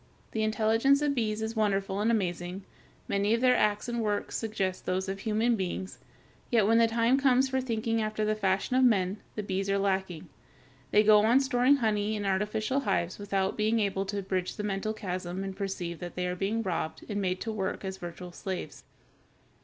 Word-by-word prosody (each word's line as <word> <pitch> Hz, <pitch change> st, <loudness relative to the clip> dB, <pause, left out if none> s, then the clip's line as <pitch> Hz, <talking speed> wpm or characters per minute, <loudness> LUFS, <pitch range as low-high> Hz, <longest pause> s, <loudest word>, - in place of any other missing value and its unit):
The 220 Hz, -, -2 dB
intelligence 225 Hz, +6 st, +3 dB
of 290 Hz, -1 st, +2 dB
bees 220 Hz, -4 st, -1 dB
is 220 Hz, +1 st, -3 dB
wonderful 200 Hz, -2 st, 0 dB
and 215 Hz, +2 st, +2 dB
amazing. 180 Hz, -3 st, -1 dB, 0.4 s
Many 200 Hz, +2 st, +2 dB
of 230 Hz, -, -3 dB
their 255 Hz, -1 st, +5 dB
acts 210 Hz, +2 st, +1 dB
and 235 Hz, -1 st, -2 dB
works 205 Hz, -2 st, -2 dB
suggest 200 Hz, -4 st, -2 dB
those 185 Hz, +1 st, 0 dB
of 195 Hz, 0 st, -4 dB
human 225 Hz, +3 st, +1 dB
beings, 190 Hz, -1 st, -4 dB, 0.5 s
yet 225 Hz, -4 st, +3 dB
when 225 Hz, +2 st, +4 dB
the 230 Hz, -, +5 dB
time 230 Hz, +3 st, +2 dB
comes 265 Hz, -1 st, +3 dB
for 265 Hz, 0 st, 0 dB
thinking 225 Hz, -2 st, -1 dB
after 215 Hz, 0 st, -1 dB
the 215 Hz, -, +2 dB
fashion 200 Hz, +3 st, 0 dB
of 260 Hz, -, +4 dB
men, 200 Hz, -4 st, +2 dB
the 210 Hz, -, -3 dB
bees 195 Hz, 0 st, -2 dB
are 200 Hz, -, +2 dB
lacking. 190 Hz, -4 st, -1 dB, 0.6 s
They 210 Hz, -, +5 dB
go 215 Hz, 0 st, +7 dB
on 235 Hz, +4 st, +5 dB
storing 265 Hz, 0 st, +3 dB
honey 215 Hz, -4 st, 0 dB
in 205 Hz, -1 st, -3 dB
artificial 210 Hz, +6 st, 0 dB
hives 195 Hz, -7 st, -1 dB
without 195 Hz, -1 st, -1 dB
being 220 Hz, +2 st, +2 dB
able 195 Hz, -2 st, -1 dB
to 200 Hz, 0 st, -3 dB
bridge 185 Hz, -1 st, -2 dB
the 210 Hz, -, -4 dB
mental 205 Hz, +1 st, -2 dB
chasm 185 Hz, -2 st, -4 dB
and 195 Hz, -1 st, -5 dB
perceive 190 Hz, -4 st, -4 dB
that 175 Hz, -1 st, -7 dB
they 180 Hz, -, -1 dB
are 180 Hz, 0 st, -2 dB
being 205 Hz, +5 st, -1 dB
robbed 170 Hz, -4 st, -3 dB
and 205 Hz, -2 st, -2 dB
made 185 Hz, -1 st, -1 dB
to 225 Hz, -, -3 dB
work 195 Hz, -2 st, -3 dB
as 190 Hz, 0 st, -4 dB
virtual 175 Hz, 0 st, -8 dB
slaves. 185 Hz, +1 st, -6 dB
210 Hz, 200 wpm, -29 LUFS, 190-225 Hz, 0.6 s, go